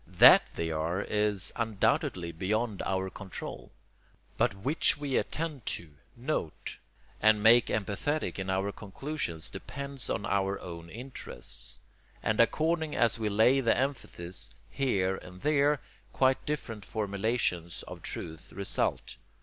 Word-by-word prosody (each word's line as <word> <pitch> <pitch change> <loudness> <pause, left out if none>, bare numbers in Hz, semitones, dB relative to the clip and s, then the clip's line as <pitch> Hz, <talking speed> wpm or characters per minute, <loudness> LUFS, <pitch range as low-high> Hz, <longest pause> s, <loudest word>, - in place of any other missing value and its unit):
THAT - - +8
they 80 0 -1
are 80 +5 -1
is 105 -2 0
undoubtedly 95 -5 +1
beyond 105 +5 -1
our 95 0 0
control; 95 -3 -7 0.7
but 110 -4 +2
WHICH 135 +14 +2
we 145 -3 -2
attend 150 -6 -2
to, 85 -3 -13 0.3
note, 120 - -3 0.4
and 110 -1 +5
make 115 +1 +7
emphatic 110 +8 -1
in 95 0 -3
our 95 +2 +1
conclusions 100 - -4
depends 140 -1 -5
on 100 - -1
our 100 0 +1
own 85 -1 -8
interests; 125 +7 -6 0.4
and, 110 - +1
according 160 +6 +2
as 115 -1 +3
we 110 -1 0
lay 110 +6 +5
the 115 -3 +3
emphasis 120 -10 -2 0.2
here 95 -9 +1
or 90 - -10
there, 145 +5 +3 0.3
quite 130 0 +2
different 115 -8 -3
formulations 100 -4 -1
of - - -9
truth 80 -1 -6
result. 100 0 -1
105 Hz, 125 wpm, -30 LUFS, 95-135 Hz, 0.7 s, THAT